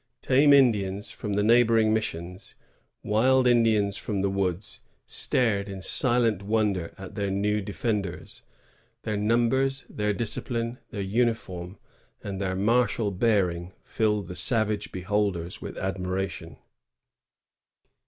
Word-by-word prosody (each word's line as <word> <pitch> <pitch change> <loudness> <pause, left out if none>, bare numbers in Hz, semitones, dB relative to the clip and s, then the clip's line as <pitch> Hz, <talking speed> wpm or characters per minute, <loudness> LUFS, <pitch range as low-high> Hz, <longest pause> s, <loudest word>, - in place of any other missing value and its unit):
Tame 140 +3 +4
Indians 105 -8 +3
from 105 - -5
the 105 +1 +1
neigh 115 +3 +6
boring 115 -2 +3
missions, 90 -4 -4 0.5
wild 130 +5 +3
Indians 110 -5 +3
from 100 -3 -3
the 100 - +1
woods, 95 0 -2 0.3
stared 105 -5 +1
in 95 -1 -6
silent 115 0 +3
wonder 100 -4 0
at 95 -1 -9
their 100 -2 -2
new 105 +2 0
defenders. 100 -2 -4 0.6
Their 110 - -2
numbers, 120 +6 +1
their 105 0 -2
discipline, 115 +3 -3
their 105 -5 -5
uniform, 95 -4 -2 0.5
and 100 -1 -5
their 95 -1 -1
martial 115 +1 +1
bearing 90 -4 0
filled 105 -3 0
the 90 - -7
savage 105 +2 0
beholders 95 0 -2
with - - -7
admiration. 95 -2 -4
105 Hz, 120 wpm, -26 LUFS, 95-115 Hz, 0.6 s, neigh